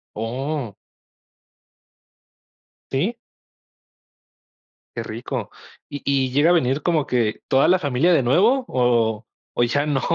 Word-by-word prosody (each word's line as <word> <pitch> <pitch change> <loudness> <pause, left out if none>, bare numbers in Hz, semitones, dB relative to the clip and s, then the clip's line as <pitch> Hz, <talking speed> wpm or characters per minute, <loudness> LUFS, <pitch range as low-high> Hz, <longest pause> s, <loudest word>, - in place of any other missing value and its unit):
Oh. 125 +2 -4 2.2
¿Sí? 185 - -1 1.8
Qué - - -2
rico. - - -5 0.4
¿Y 145 -1 -6
y 135 -2 +1
llega 145 +5 +3
a - - +5
venir 140 -4 +1
como 155 -3 +1
que 115 -4 -1
toda 135 - +3
la 185 - +5
familia 150 +2 +1
de 145 - +3
nuevo 215 - +3
o 115 -3 +1 0.3
o - - +1
ya 145 +5 +1
no? 145 -3 0
135 Hz, 120 wpm, -22 LUFS, 125-155 Hz, 2.2 s, a